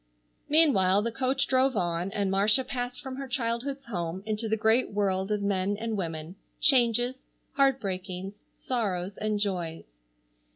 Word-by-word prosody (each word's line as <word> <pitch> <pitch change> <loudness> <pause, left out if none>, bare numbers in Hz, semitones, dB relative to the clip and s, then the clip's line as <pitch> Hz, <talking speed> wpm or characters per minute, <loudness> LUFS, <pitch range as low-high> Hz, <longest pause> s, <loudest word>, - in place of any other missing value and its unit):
Meanwhile 210 - +5
the 235 - -1
coach 265 +3 0
drove 260 -2 +2
on, 175 +1 -1
and 200 -1 -1
Marcia 210 +6 +3
passed 250 -1 -4
from 265 -1 -7
her 275 0 -5
childhood's 255 +3 -2
home 180 -4 -4
into 215 +1 -2
the 220 - +1
great 220 +3 +2
world 195 -1 -1
of 210 -1 0
men 200 0 0
and 225 0 -3
women, 165 -1 -5 0.2
changes, 245 -1 +3 0.3
heartbreakings, 195 -7 -1
sorrows 200 -6 -3
and 215 -1 -1
joys. 170 - -4
210 Hz, 140 wpm, -28 LUFS, 190-250 Hz, 0.3 s, Meanwhile